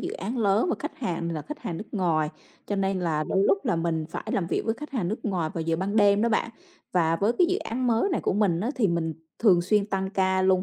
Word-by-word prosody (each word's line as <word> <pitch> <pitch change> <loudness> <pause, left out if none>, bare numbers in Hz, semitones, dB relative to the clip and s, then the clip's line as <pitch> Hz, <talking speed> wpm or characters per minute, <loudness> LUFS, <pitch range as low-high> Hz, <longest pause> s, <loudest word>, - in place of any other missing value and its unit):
dự - - -4
án 225 +8 -4
lớn 210 - +2
và - - +1
khách 300 - -6
hàng 170 -8 -2
là 155 -2 -4
khách 300 +1 -7
hàng 180 -9 -5
nước 215 - -6
ngoài, 165 -6 +1 0.4
cho 205 - -2
nên 195 -1 0
là 155 -3 0
đôi 195 - +2
lúc 200 0 +4
là - - +1
mình 165 -1 -1
phải - - -5
làm 180 - 0
việc - - -1
với 225 - 0
khách 300 +5 -9
hàng 220 -10 -1
nước 215 - -2
ngoài 180 -7 -1
vào 165 - -2
giờ 165 0 0
ban 195 +4 -2
đêm 205 -1 +5
đó 235 - +3
bạn. 230 +1 0 0.4
Và 165 -2 +2
với 205 +6 +2
cái 360 - +6
dự 370 +1 +1
án 250 - -3
mới 235 - +2
này 350 - 0
của - - 0
mình 190 -4 +2
á, 225 +6 -1
thì 225 -6 +2
mình 165 -2 -1 0.2
thường 185 -6 +5
xuyên 200 +2 +2
tăng 190 -2 -2
ca 190 -2 +1
luôn, 185 -1 +3
195 Hz, 275 wpm, -26 LUFS, 170-220 Hz, 0.4 s, cái